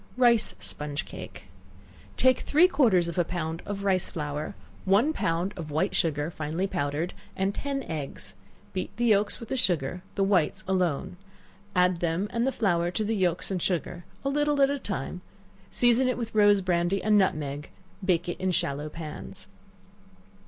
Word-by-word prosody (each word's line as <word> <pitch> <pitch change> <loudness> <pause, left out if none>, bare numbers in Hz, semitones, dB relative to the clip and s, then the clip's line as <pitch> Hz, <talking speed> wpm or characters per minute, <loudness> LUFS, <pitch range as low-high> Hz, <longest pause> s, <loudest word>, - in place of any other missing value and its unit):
Rice 240 -3 +4
Sponge 150 -1 -4
Cake. - - -9 0.7
Take 260 0 +4
three 320 +5 +5
quarters 220 - +3
of 170 +1 -2
a - - +5
pound 165 -1 -4
of 200 -1 -4
rice 190 -2 +1
flour, 150 +3 -4 0.3
one 210 +11 +3
pound 175 - -1
of 160 -3 -6
white 155 +7 0
sugar, 155 -2 0
finely 160 +4 -2
powdered, 160 -2 -2 0.2
and 195 +1 0
ten 275 +2 -3
eggs; 140 - -4 0.4
beat 185 - -2
the 240 - +1
yelks 210 -2 +3
with 230 - -9
the - - -1
sugar, 175 - 0
the 195 - +2
whites 195 -1 +2
alone; 180 -3 0 0.6
add 180 0 +4
them 170 +4 0
and 235 +2 +1
the - - +2
flour 175 -8 +1
to 215 +5 -1
the 220 +2 0
yelks 180 -1 +1
and 185 -2 -1
sugar, 175 0 -2 0.2
a - - +2
little 295 0 +1
at 275 - +4
a 285 - -2
time; 180 - -4 0.5
season 245 +1 +4
it 255 - 0
with 230 -2 -4
rose 205 -2 +5
brandy 180 +1 +1
and 215 0 +4
nutmeg, 150 -7 0 0.3
and 190 - -8
bake 175 -1 +2
it 175 - -4
in 185 - 0
shallow 150 -4 -1
pans. 155 -1 -7
185 Hz, 175 wpm, -27 LUFS, 165-215 Hz, 0.7 s, three